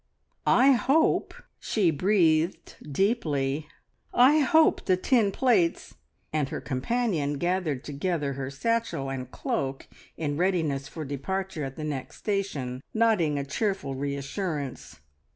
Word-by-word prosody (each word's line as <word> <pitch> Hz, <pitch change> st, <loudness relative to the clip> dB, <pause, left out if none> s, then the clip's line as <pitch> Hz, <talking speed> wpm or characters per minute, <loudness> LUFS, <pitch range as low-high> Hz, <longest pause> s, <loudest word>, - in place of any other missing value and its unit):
"I 265 Hz, +3 st, +6 dB
hope 280 Hz, -, +2 dB, 0.2 s
" -, -, -48 dB
she 190 Hz, -7 st, +1 dB
breathed 165 Hz, 0 st, +1 dB, 0.2 s
deeply 150 Hz, -, 0 dB, 0.5 s
"I 265 Hz, +5 st, +6 dB
hope 315 Hz, +3 st, +4 dB
the 185 Hz, -, +3 dB
tin 215 Hz, 0 st, +2 dB
plates 205 Hz, -9 st, +1 dB, 0.2 s
" -, -, -44 dB
and 150 Hz, -3 st, 0 dB
her -, -, -4 dB
companion 155 Hz, -, -1 dB
gathered 175 Hz, -3 st, -1 dB
together 145 Hz, -1 st, -2 dB
her 135 Hz, -1 st, -4 dB
satchel 140 Hz, -3 st, -1 dB
and 130 Hz, -2 st, -5 dB
cloak 135 Hz, +1 st, -3 dB, 0.3 s
in 145 Hz, -2 st, -2 dB
readiness 160 Hz, -7 st, 0 dB
for 155 Hz, -2 st, -7 dB
departure 165 Hz, +5 st, -3 dB
at 135 Hz, -1 st, -5 dB
the 155 Hz, -, -6 dB
next 145 Hz, -4 st, -5 dB
station, 150 Hz, -, -2 dB
nodding 210 Hz, -10 st, +3 dB
a 140 Hz, -, -2 dB
cheerful 195 Hz, -1 st, -2 dB
reassurance. 140 Hz, +2 st, -4 dB
160 Hz, 130 wpm, -27 LUFS, 140-205 Hz, 0.5 s, I